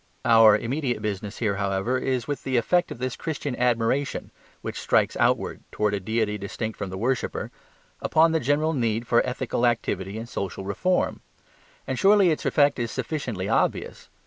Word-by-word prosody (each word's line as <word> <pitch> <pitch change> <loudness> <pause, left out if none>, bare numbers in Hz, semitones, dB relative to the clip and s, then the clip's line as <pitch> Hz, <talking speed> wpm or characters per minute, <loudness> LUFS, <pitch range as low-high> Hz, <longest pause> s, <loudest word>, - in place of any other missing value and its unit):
Our 115 -2 +7
immediate 125 +3 -2
business 105 0 -4
here, 100 -4 0
however, 100 +5 0
is 130 -2 -1
with 145 -1 -3
the 130 -2 -1
effect 175 +9 +2
of - - -7
this 130 0 -3
Christian 145 -4 -4
admiration 125 +3 0 0.3
(which - - -4
strikes - - +2
outwards, - - +1
towards 105 -1 0
a - - -2
deity 105 +1 -1
distinct 110 +3 -4
from 100 - -3
the 95 - -6
worshipper) 125 +5 -2 0.5
upon 160 +1 +4
the 160 - +2
general 150 +4 +1
need 115 -4 0
for 120 0 +3
ethical 125 -1 -2
activity 110 -4 0
and 115 +1 -6
social 95 -4 -5
reform. 180 - 0 0.7
And - - -3
surely 200 -3 +5
its 155 - -2
effect 145 -2 +3
is 120 -1 -1
sufficiently 120 - -3
obvious. 115 - -1
120 Hz, 170 wpm, -25 LUFS, 105-140 Hz, 0.7 s, Our